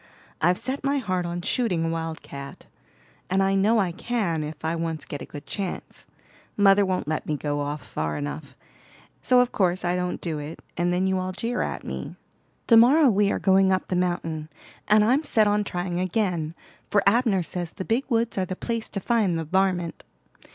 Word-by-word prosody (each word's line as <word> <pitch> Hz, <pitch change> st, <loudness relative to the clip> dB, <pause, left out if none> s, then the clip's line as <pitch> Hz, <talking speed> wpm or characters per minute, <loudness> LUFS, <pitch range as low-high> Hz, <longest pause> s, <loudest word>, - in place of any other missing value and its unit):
I've 175 Hz, +3 st, +3 dB
set 260 Hz, +2 st, -3 dB
my 280 Hz, +1 st, +1 dB
heart 185 Hz, -8 st, -1 dB
on 175 Hz, 0 st, -4 dB
shooting 185 Hz, -10 st, +1 dB
a -, -, 0 dB
wildcat, 160 Hz, -4 st, -6 dB, 0.6 s
and 190 Hz, +1 st, +2 dB
I 195 Hz, 0 st, +2 dB
know 205 Hz, +4 st, +3 dB
I 190 Hz, -5 st, +1 dB
can 180 Hz, -5 st, -1 dB
if 150 Hz, +1 st, -7 dB
I 160 Hz, +1 st, 0 dB
once 165 Hz, -2 st, -3 dB
get 145 Hz, -, -6 dB
a -, -, -7 dB
good 145 Hz, 0 st, -9 dB
chance. 195 Hz, -3 st, -5 dB, 0.5 s
Mother 200 Hz, 0 st, +6 dB
won't 185 Hz, -5 st, -1 dB
let 155 Hz, 0 st, -2 dB
me 150 Hz, -, -1 dB
go 145 Hz, 0 st, -2 dB
off 145 Hz, +1 st, -3 dB
far 75 Hz, -1 st, -3 dB
enough, 75 Hz, 0 st, -6 dB, 0.7 s
so 250 Hz, -1 st, +5 dB
of 250 Hz, -, 0 dB
course 185 Hz, -2 st, +1 dB
I 175 Hz, +1 st, +1 dB
don't 180 Hz, 0 st, -2 dB
do 160 Hz, -3 st, -3 dB
it, 150 Hz, +2 st, -7 dB, 0.2 s
and 175 Hz, +1 st, +1 dB
then 180 Hz, +1 st, +1 dB
you 190 Hz, 0 st, +1 dB
all 185 Hz, 0 st, -3 dB
jeer 235 Hz, +5 st, -2 dB
at -, -, -3 dB
me. -, -, -6 dB, 0.5 s
To 230 Hz, -, +5 dB
morrow 265 Hz, +4 st, +6 dB
we 205 Hz, 0 st, +2 dB
are -, -, 0 dB
going 190 Hz, 0 st, +4 dB
up 185 Hz, 0 st, 0 dB
the 185 Hz, -, 0 dB
mountain, 165 Hz, -3 st, -1 dB, 0.4 s
and 210 Hz, 0 st, +5 dB
I'm 260 Hz, +7 st, +3 dB
set 220 Hz, -7 st, +3 dB
on 205 Hz, 0 st, +2 dB
trying 175 Hz, -2 st, -3 dB
again, 180 Hz, -4 st, -1 dB, 0.3 s
for 205 Hz, -, +3 dB
Abner 210 Hz, -3 st, +3 dB
says 175 Hz, 0 st, -4 dB
the 190 Hz, -, -6 dB
big 235 Hz, +5 st, 0 dB
woods 230 Hz, -4 st, +1 dB
are 185 Hz, -, +1 dB
the 185 Hz, -, -4 dB
place 230 Hz, +2 st, -3 dB
to 200 Hz, -, -3 dB
find 205 Hz, -5 st, +1 dB
the 165 Hz, -, -3 dB
'varmint'. 180 Hz, -1 st, 0 dB
185 Hz, 200 wpm, -25 LUFS, 165-210 Hz, 0.7 s, Mother